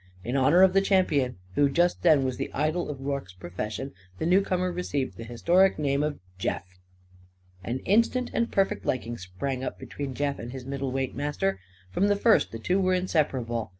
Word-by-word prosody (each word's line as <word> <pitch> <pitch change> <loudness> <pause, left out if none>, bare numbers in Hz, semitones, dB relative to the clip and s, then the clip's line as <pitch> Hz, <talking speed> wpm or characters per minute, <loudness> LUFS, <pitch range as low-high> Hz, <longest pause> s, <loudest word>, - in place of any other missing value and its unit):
In 120 +3 -3
honour 150 +7 +5
of 190 -1 +5
the 195 - +5
champion 165 -10 +2 0.2
who 145 +5 +3
just 175 +5 +2
then 155 -6 +5
was 130 -1 -2
the - - -4
idol 155 +5 0
of 140 -2 -6
Rorke's 135 -9 -4
profession, 105 +8 -5 0.2
the - - -2
newcomer 185 0 +2
received 145 -7 -2
the 115 - -8
historic 170 +12 +3
name 140 -1 +1
of 150 -1 -1 0.2
"Jeff." 90 0 -4 0.8
An 120 +2 -2
instant 230 +5 +2
and 235 - 0
perfect 195 -1 +1
liking 120 -2 -2
sprang 125 +9 -4
up - - -4
between 140 -3 -6
Jeff 140 0 -1
and 120 +1 -6
his 130 -2 -7
middleweight 135 -1 -2
master. 95 -10 -1 0.3
From 195 - +2
the 205 - +3
first 220 +3 +3
the 115 - -5
two 180 - 0
were 185 -1 +2
inseparable. 130 -10 -1
140 Hz, 185 wpm, -27 LUFS, 125-180 Hz, 0.8 s, honour